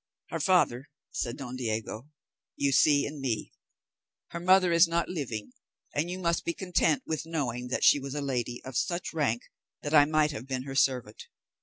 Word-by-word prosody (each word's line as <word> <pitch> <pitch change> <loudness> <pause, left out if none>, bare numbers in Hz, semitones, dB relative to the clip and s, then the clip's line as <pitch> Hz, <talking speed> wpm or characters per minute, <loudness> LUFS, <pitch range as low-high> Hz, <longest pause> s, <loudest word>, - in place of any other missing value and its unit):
"Her - - -2
father," 165 - +2 0.2
said 120 -1 -3
Don 130 -2 -6
Diego, 115 +2 -4 0.5
"you 140 -1 +1
see 140 +2 +4
in 145 -1 -6
me; 120 -5 -2 0.8
her 170 - -5
mother 185 0 +4
is 170 +1 +6
not 170 0 0
living, 125 - -5 0.4
and 155 +4 -1
you 180 - -4
must 170 -2 0
be 170 - -2
content 175 -5 +1
with 160 0 -3
knowing 125 -7 -2
that 125 - -2
she 145 - +6
was 135 +1 -6
a - - -1
lady 125 -3 -3
of 130 -1 -8
such 175 +11 -1
rank 135 -7 0 0.4
that 145 - -3
I 145 -2 +8
might 155 0 +2
have 130 -3 -7
been 130 -1 -3
her 135 0 -7
servant. 130 -5 0
140 Hz, 185 wpm, -29 LUFS, 125-165 Hz, 0.8 s, I